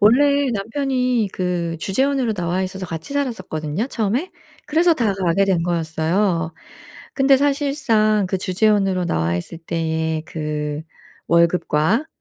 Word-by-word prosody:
원래 280 +5 +4
남편이 250 +1 0
그 175 -2 -2
주재원으로 260 - 0
나와 180 -1 -1
있어서 185 0 -5
같이 165 - -6
살았었거든요 190 - -2
처음에. 240 - -1 0.4
그래서 330 +3 +3
다 225 -8 +1
가게 190 0 +2
된 185 -4 +1
거였어요. 165 +1 0 0.6
근데 270 0 +5
사실상 275 -7 +2
그 190 - 0
주재원으로 195 -1 +1
나와 85 - 0
있을 90 - -6
때에 160 -1 -2
그 150 -1 -3 0.5
월급과 170 - +2
195 Hz, 290 characters per minute, -21 LUFS, 165-250 Hz, 0.6 s, 근데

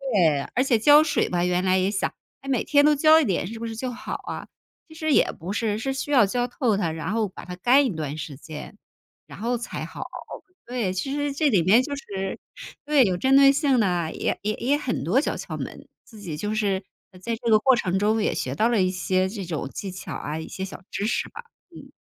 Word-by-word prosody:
对， 160 -7 +3
而 255 - +3
且 260 -4 +3
浇 290 +6 +7
水 305 - 0
吧， 175 0 0
原 180 0 +1
来 185 0 +3
也 185 +1 +1
想， 195 - -1 0.3
哎， 275 - -8
每 255 - +1
天 285 -1 +4
都 300 - +6
浇 310 +2 +6
一 - - +1
点 185 -4 -1
是 225 +3 -7
不 230 - -4
是 225 - -6
就 250 +3 -3
好 250 +2 -6
啊。 - - -6 0.4
其 315 - -13
实 315 -2 0
也 - - +4
不 180 +5 -6
是， 215 -1 -1
是 270 +4 -2
需 270 +2 -4
要 250 -6 +6
浇 245 +5 -1
透 245 -3 0
它， 170 -5 0
然 160 +2 -4
后 225 -2 +1
把 - - -11
它 180 0 -7
干 260 +9 +4
一 - - +1
段 150 -1 -4
时 150 -3 -6
间， 155 +7 -9 0.5
然 - - -11
后 235 +3 0
才 235 - -5
好。 - - -7 0.6
对， 235 -7 -2
其 230 +9 -3
实 290 0 -1
这 290 +1 +2
里 200 -7 +3
面 215 +8 +5
就 285 - -5
是 195 -8 -5 0.5
对， 295 -3 +5
有 185 -3 0
针 265 +6 +3
对 275 0 +8
性 280 -3 +2
的， 175 -6 0
也 - - -2
也 210 +1 0
也 275 +4 +1
很 260 - -3
多 185 - +2
小 - - -2
窍 - - -6
门。 - - -7 0.2
自 220 - -15
己 170 -7 -6
就 210 +6 -2
是 200 -3 0 0.4
在 230 +4 -2
这 235 0 -3
个 215 - +6
过 260 +4 +4
程 190 -5 0
中 215 +2 +2
也 - - +1
学 130 +1 -3
到 220 +9 +2
了 230 -5 +2
一 185 - +2
些 185 0 0
这 200 -1 -6
种 155 -5 -4
技 195 +6 -6
巧 185 - -7
啊， 150 +2 -4
一 160 - -7
些 190 - -6
小 190 - -10
知 200 - -2
识 - - -1
吧。 475 - -10 0.3
嗯。 - - -12
215 Hz, 265 characters per minute, -24 LUFS, 185-265 Hz, 0.6 s, 对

